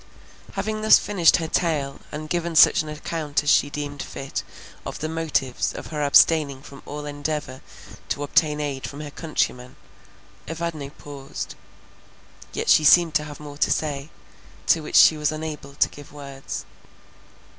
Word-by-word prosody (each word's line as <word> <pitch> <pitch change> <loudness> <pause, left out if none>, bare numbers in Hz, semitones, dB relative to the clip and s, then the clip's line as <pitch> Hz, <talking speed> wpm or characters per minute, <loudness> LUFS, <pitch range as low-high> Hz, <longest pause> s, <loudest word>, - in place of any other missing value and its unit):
Having 215 0 -3
thus 220 - +7
finished 185 -5 +3
her 165 -2 -3
tale, 150 -5 -1
and 155 +1 -6
given 170 +1 -2
such 165 - +7
an 155 - -7
account 150 -1 -2
as 150 - +3
she 145 - +4
deemed 145 -1 -5
fit, 135 0 -5 0.4
of - - -6
the 155 - -3
motives 155 -5 -1
of - - -8
her 150 - -2
abstaining 140 -1 +4
from 140 -1 -12
all 150 +1 -6
endeavour 145 -2 -4 0.5
to 145 - -2
obtain 150 +1 +2
aid 140 -3 -3
from 145 +1 -8
her 150 -1 -7
countrymen, 125 -6 -2 0.7
Evadne 165 -3 -4
paused; 140 -1 -8 1.0
yet - - -4
she 155 - +6
seemed 165 +1 +6
to 150 -1 +1
have 145 -1 -9
more 145 -1 -10
to - - +3
say, 145 -1 -1 0.6
to 165 - +3
which 150 - -6
she 155 - +8
was 150 0 0
unable 155 -3 -6
to - - +3
give 145 -1 -13
words. 140 -2 -7
150 Hz, 160 wpm, -24 LUFS, 140-160 Hz, 1.0 s, she